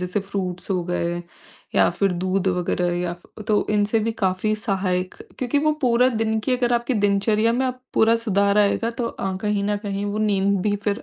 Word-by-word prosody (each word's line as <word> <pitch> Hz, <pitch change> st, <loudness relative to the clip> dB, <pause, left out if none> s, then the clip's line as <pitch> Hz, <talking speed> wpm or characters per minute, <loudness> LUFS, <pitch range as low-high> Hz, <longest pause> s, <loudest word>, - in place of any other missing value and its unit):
जैसे 180 Hz, +3 st, -1 dB
फ्रूट्स 190 Hz, -2 st, -4 dB
हो 180 Hz, -2 st, +1 dB
गए 175 Hz, -1 st, -2 dB, 0.5 s
या -, -, +5 dB
फिर 195 Hz, -2 st, 0 dB
दूध 190 Hz, 0 st, +1 dB
वगैरह 175 Hz, 0 st, 0 dB
या 175 Hz, -1 st, -2 dB, 0.4 s
तो 210 Hz, -1 st, +2 dB
इनसे 210 Hz, +2 st, +2 dB
भी 225 Hz, +1 st, -1 dB
काफ़ी 185 Hz, +3 st, +1 dB
सहायक 185 Hz, -3 st, -1 dB, 0.2 s
क्योंकि 255 Hz, +3 st, 0 dB
वो 305 Hz, -, +4 dB
पूरा 250 Hz, +1 st, +4 dB, 0.2 s
दिन 220 Hz, 0 st, 0 dB
की 250 Hz, +3 st, 0 dB
अगर 245 Hz, -1 st, 0 dB
आपकी 240 Hz, +2 st, 0 dB
दिनचर्या 210 Hz, +2 st, +2 dB
में 260 Hz, +2 st, +1 dB
अ, 255 Hz, -, +1 dB, 0.2 s
पूरा 225 Hz, +1 st, +4 dB
सुधार 200 Hz, 0 st, +3 dB
आएगा 210 Hz, +3 st, +2 dB
तो 235 Hz, 0 st, -3 dB
अ, 190 Hz, -3 st, -4 dB
कहीं 210 Hz, -1 st, 0 dB
न 205 Hz, 0 st, 0 dB
कहीं 200 Hz, 0 st, -2 dB
वो 205 Hz, +1 st, -2 dB
नींद 200 Hz, -2 st, +2 dB
भी 205 Hz, -1 st, +1 dB
फिर 205 Hz, +3 st, 0 dB
205 Hz, 195 wpm, -23 LUFS, 190-220 Hz, 0.5 s, या